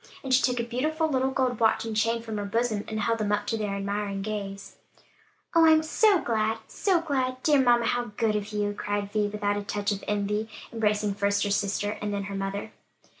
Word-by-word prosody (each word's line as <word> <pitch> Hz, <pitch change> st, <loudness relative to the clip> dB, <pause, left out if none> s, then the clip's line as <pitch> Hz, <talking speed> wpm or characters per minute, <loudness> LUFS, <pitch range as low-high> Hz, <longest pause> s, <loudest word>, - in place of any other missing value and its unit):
And 265 Hz, -1 st, -1 dB
she 255 Hz, -, +6 dB
took 250 Hz, -1 st, +1 dB
a -, -, +1 dB
beautiful 310 Hz, +7 st, 0 dB
little 265 Hz, -3 st, +1 dB
gold 255 Hz, -3 st, 0 dB
watch 225 Hz, 0 st, +3 dB
and 225 Hz, -1 st, -4 dB
chain 230 Hz, +2 st, +1 dB
from 220 Hz, -2 st, -5 dB
her 205 Hz, -, -3 dB
bosom, 220 Hz, 0 st, 0 dB
and 215 Hz, 0 st, -3 dB
held 230 Hz, +2 st, 0 dB
them 210 Hz, -1 st, 0 dB
up 205 Hz, 0 st, 0 dB
to 225 Hz, -, -1 dB
their 210 Hz, -2 st, -2 dB
admiring 200 Hz, 0 st, -2 dB
gaze. 195 Hz, -2 st, -5 dB, 0.8 s
"Oh, 330 Hz, -1 st, +6 dB
I'm 315 Hz, 0 st, +6 dB
so 405 Hz, +5 st, +4 dB
glad, 220 Hz, -1 st, 0 dB
so 370 Hz, -4 st, +1 dB
glad! 260 Hz, -5 st, -1 dB
Dear 290 Hz, -3 st, +5 dB
mamma, 240 Hz, -2 st, +4 dB
how 245 Hz, +1 st, 0 dB
good 220 Hz, -2 st, +1 dB
of 210 Hz, 0 st, -3 dB
you!" 205 Hz, -1 st, -1 dB
cried 205 Hz, 0 st, -3 dB
Vi, 210 Hz, -1 st, +1 dB
without 205 Hz, 0 st, -1 dB
a 205 Hz, -, -3 dB
touch 205 Hz, +1 st, -2 dB
of 200 Hz, -1 st, -3 dB
envy 210 Hz, +1 st, -1 dB, 0.2 s
embracing 210 Hz, -2 st, +1 dB
first 200 Hz, 0 st, +1 dB
her 205 Hz, -, -1 dB
sister, 200 Hz, +1 st, -1 dB
and 210 Hz, 0 st, -2 dB
then 200 Hz, -1 st, -2 dB
her 200 Hz, 0 st, -5 dB
mother. 195 Hz, +2 st, -4 dB
215 Hz, 220 wpm, -27 LUFS, 205-245 Hz, 0.8 s, she